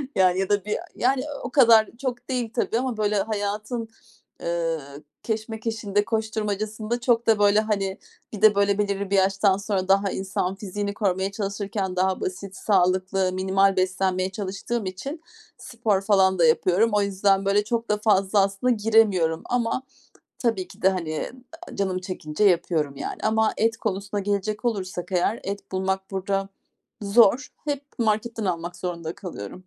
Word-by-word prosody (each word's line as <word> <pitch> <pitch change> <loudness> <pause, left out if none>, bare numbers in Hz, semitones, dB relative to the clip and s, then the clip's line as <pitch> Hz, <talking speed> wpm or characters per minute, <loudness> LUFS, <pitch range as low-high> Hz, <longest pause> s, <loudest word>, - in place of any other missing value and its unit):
Yani, 185 -1 +4
ya 195 - -1
da 205 -1 +1
1 210 - -1 0.2
yani, 260 +1 +1
ııı, 295 -1 -7
o 245 - -4
kadar 230 -5 +6
çok 250 -2 -4
değil 245 -3 -2
tabii 235 -1 0
ama 255 -3 -2
böyle 210 -1 +1
hayatın, 215 +3 -3 0.6
ııı, 165 -4 -3 0.2
keşmekeşinde, 220 -2 -2
koşturmacasında 215 +1 -2
çok 235 -1 +1
da 220 -2 +4
böyle, 205 0 +5
hani, 200 -3 -1 0.4
bir 210 - -6
de 215 -2 +7
böyle 200 0 +2
belirli 200 -1 -1
bir 200 - +1
yaştan 195 0 +3
sonra 200 -2 -2
daha 195 0 +3
insan 190 0 -2
fiziğini 200 0 -4
korumaya 195 -2 0
çalışırken 200 -2 -3
daha 185 +1 +1
basit, 185 +1 -5
sağlıklı, 185 -1 +1
minimal 190 +1 +2
beslenmeye 185 0 0
çalıştığım 200 +3 -4
için 270 - -6 0.4
spor 225 -5 -1
falan 190 -2 +3
da 170 - +6
yapıyorum. 180 +7 +3
O 210 - +3
yüzden 195 0 +2
böyle 200 +1 +3
çok 230 +2 -2
da 210 - +2
fazla 205 -1 +2
aslında 200 +6 +1
giremiyorum 205 -7 +3
ama 245 +1 -1 0.6
tabii 225 -7 -1
ki - - -16
de, 190 - +6
hani, 165 -5 -2 0.4
aaa, - - -10
canım 190 -2 0
çekince 180 -2 -3
yapıyorum 165 -6 +2
yani - - -5
ama 220 0 +2
et 225 0 +1
konusuna 200 -1 -3
gelecek 205 +2 -2
olursak 190 -5 -3
eğer 185 +5 +1
et 200 0 -6
bulmak 190 0 -2
burada 195 0 -2 0.5
zor. 230 +4 +4 0.2
Hep 290 -2 -2
marketten 225 0 0
almak 175 -1 -3
zorunda 170 -2 -4
kalıyorum. 180 - -8
200 Hz, 155 wpm, -24 LUFS, 190-220 Hz, 0.6 s, de